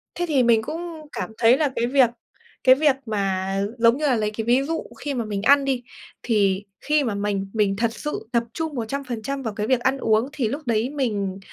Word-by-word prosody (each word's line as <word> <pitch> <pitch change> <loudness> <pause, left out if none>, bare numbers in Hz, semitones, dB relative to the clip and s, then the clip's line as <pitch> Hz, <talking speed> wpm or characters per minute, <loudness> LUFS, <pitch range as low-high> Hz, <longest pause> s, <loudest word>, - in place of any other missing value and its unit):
Thế 350 - -1
thì 275 -5 +3
mình 230 -2 +4
cũng 325 +1 -6
cảm - - -4
thấy 240 +3 +5
là 295 -4 +1
cái 235 - 0
việc 255 -2 +4 0.5
cái 255 - +7
việc 290 -1 +3
mà, 195 -3 -1 0.2
giống 230 +2 +4
như 305 - -1
là, 260 - +3
lấy 215 -2 -1
cái 220 +1 -4
ví 245 +3 +3
dụ 325 +3 -2 0.2
khi 290 -1 -3
mà 235 -3 -2
mình 205 -2 -3
ăn 280 +4 +5
đi, 260 -3 -1 0.4
thì 205 -3 +1 0.2
khi 300 -1 +2
mà 225 -5 -1
mình 200 -1 -2
mình 205 -3 +1
thật 230 0 0
sự 295 -4 -5
tập 235 -1 +2
trung 320 -2 -3
100% 260 +2 -4
vào 225 -3 -3
cái 210 0 -3
việc 260 -2 +3
ăn 265 +2 +1
uống, 225 0 +1
thì 250 -6 0
lúc 280 +8 -3
đấy 230 +2 +1
mình 210 -9 -2
235 Hz, 225 wpm, -23 LUFS, 215-275 Hz, 0.5 s, cái